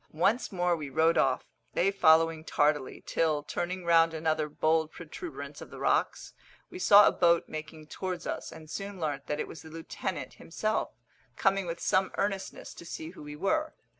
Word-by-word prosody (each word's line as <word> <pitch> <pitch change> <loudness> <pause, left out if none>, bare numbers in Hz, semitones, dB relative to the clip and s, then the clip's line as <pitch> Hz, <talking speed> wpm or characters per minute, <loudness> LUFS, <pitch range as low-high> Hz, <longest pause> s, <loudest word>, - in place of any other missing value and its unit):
Once 195 +10 +1
more 175 -2 +1
we 150 -3 -6
rowed 160 +5 +3
off, 130 -1 +2 0.3
they 195 +3 +3
following 165 -3 +4
tardily, 145 -3 0
till, 155 -3 +1
turning 175 +4 -3
round 165 -1 +4
another 155 -1 0
bold 160 +1 +1
protuberance 175 - -8
of - - -9
the - - -10
rocks, - - 0 0.4
we 365 - -7
saw 205 - +8
a - - +5
boat 170 -1 +3
making 155 0 -7
towards 180 +2 -5
us, - - -4
and 160 -1 -11
soon 195 +3 -6
learnt 145 -4 -3
that 150 - -2
it - - -2
was - - -10
the 160 - -12
lieutenant 165 +3 -5
himself, 215 +6 -2 0.5
coming 195 -2 +1
with 170 0 -4
some 190 0 +2
earnestness 195 -1 -3
to - - -11
see 165 -1 -7
who 185 - -13
we 150 0 -8
were. 305 - 0
165 Hz, 180 wpm, -29 LUFS, 155-190 Hz, 0.5 s, saw